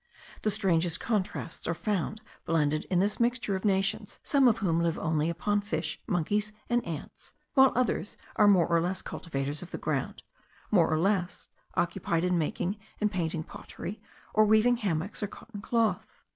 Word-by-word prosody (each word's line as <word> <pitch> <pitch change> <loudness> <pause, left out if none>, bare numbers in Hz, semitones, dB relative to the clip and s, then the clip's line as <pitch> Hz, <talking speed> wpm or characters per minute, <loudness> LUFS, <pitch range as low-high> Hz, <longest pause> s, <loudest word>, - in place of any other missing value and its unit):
The 215 - +1
strangest 180 -5 +1
contrasts 195 -6 -2
are 170 - 0
found 210 +2 -2 0.2
blended 155 -2 +1
in 185 - 0
this 200 +2 +1
mixture 235 -4 +1
of 190 - -4
nations, 195 -2 0
some 275 -3 +4
of 230 -2 +4
whom 170 -6 +1
live 170 -1 +1
only 160 0 0
upon 205 +5 0
fish, 160 -6 -3
monkeys, 205 +5 0 0.2
and 240 0 +3
ants; 160 -3 -7 0.2
while 265 -2 +7
others 245 -4 0 0.2
are 210 - +5
more 185 -5 +6
or 170 -1 +2
less 180 +2 -2
cultivators 145 -3 -4
of 180 - -8
the - - -5
ground, - - -2 0.5
more 175 -6 +4
or 155 - +2
less 185 +1 0 0.3
occupied 170 -1 0
in 180 0 +2
making 175 +5 -1 0.2
and 210 -1 +1
painting 165 -4 -1
pottery, 195 +5 -8 0.3
or 215 - +6
weaving 220 +3 +4
hammocks 190 -2 -2
or 205 - 0
cotton 205 +1 -10
cloth. 230 +1 0
190 Hz, 170 wpm, -29 LUFS, 165-210 Hz, 0.5 s, while